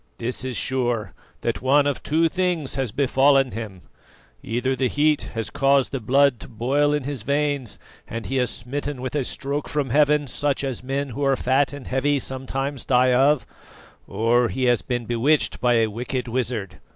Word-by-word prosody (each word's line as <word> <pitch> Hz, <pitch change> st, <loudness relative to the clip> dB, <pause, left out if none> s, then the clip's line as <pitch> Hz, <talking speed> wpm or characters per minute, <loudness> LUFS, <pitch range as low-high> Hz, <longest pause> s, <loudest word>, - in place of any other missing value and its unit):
This 120 Hz, +2 st, -2 dB
is 130 Hz, -2 st, -3 dB
sure, 120 Hz, -4 st, -1 dB, 0.3 s
that 115 Hz, -, -2 dB
one 140 Hz, +3 st, +4 dB
of 145 Hz, -2 st, -1 dB
two 165 Hz, +2 st, +2 dB
things 180 Hz, -5 st, -1 dB
has 130 Hz, -5 st, -2 dB
befallen 135 Hz, +1 st, +3 dB
him: 100 Hz, -5 st, -7 dB, 0.6 s
either 125 Hz, +3 st, -1 dB
the 130 Hz, 0 st, +1 dB
heat 150 Hz, +2 st, +2 dB
has 115 Hz, -1 st, -3 dB
caused 135 Hz, -1 st, +2 dB
the 135 Hz, -, -2 dB
blood 135 Hz, +2 st, +3 dB
to -, -, -10 dB
boil 135 Hz, +5 st, +1 dB
in 150 Hz, -2 st, 0 dB
his 140 Hz, -3 st, -4 dB
veins 140 Hz, -1 st, -1 dB, 0.3 s
and 115 Hz, 0 st, -6 dB
he 135 Hz, 0 st, -1 dB
is 125 Hz, -2 st, +1 dB
smitten 140 Hz, +4 st, -5 dB
with 130 Hz, 0 st, -4 dB
a 145 Hz, -2 st, 0 dB
stroke 140 Hz, +3 st, -3 dB
from 145 Hz, -4 st, -1 dB
heaven, 150 Hz, +1 st, +3 dB
such 140 Hz, +2 st, -1 dB
as 135 Hz, -4 st, -3 dB
men 135 Hz, +2 st, -3 dB
who 140 Hz, +4 st, -4 dB
are 135 Hz, -1 st, +3 dB
fat 130 Hz, +2 st, +1 dB
and 145 Hz, -2 st, -9 dB
heavy 140 Hz, +3 st, +1 dB
sometimes 135 Hz, +1 st, -3 dB
die 125 Hz, 0 st, +3 dB
of; 135 Hz, +2 st, +3 dB, 0.6 s
or 120 Hz, +2 st, +2 dB
he 130 Hz, -, -3 dB
has 120 Hz, -2 st, +3 dB
been 120 Hz, -2 st, -3 dB
bewitched 120 Hz, +7 st, +1 dB
by 120 Hz, -1 st, +3 dB
a 115 Hz, -1 st, +4 dB
wicked 125 Hz, +4 st, -4 dB
wizard. 115 Hz, -6 st, -3 dB
130 Hz, 185 wpm, -23 LUFS, 120-145 Hz, 0.6 s, one